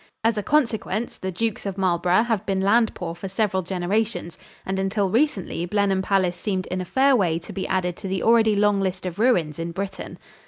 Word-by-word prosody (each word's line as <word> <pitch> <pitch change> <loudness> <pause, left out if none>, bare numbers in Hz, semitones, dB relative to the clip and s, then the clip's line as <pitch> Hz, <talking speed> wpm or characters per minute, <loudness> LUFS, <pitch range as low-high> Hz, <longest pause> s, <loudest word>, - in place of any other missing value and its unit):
As 225 0 +2
a 210 - -1
consequence, 235 -2 0
the 190 - -4
Dukes 225 +4 -2
of 195 -1 -4
Marlborough 180 +1 +2
have 225 -4 -1
been 195 -1 0
land 220 +4 +3
poor 170 -2 -4
for 190 +3 -7
several 195 -1 0
generations 185 +1 -2 0.3
and 190 0 -2
until 195 0 0
recently 215 - 0
Blenheim 200 -1 +1
Palace 190 -2 +1
seemed 190 -2 -2
in 185 0 -1
a - - -5
fair 270 +7 +3
way 175 -8 +2
to 170 - -9
be 190 - -3
added 180 -2 -1
to - - -6
the 190 -1 -2
already 225 -2 +4
long 205 -1 +3
list 185 -1 -2
of 180 +1 -5
ruins 175 - +2
in 165 +1 -3
Britain. 190 +2 -6
195 Hz, 205 wpm, -23 LUFS, 180-220 Hz, 0.3 s, already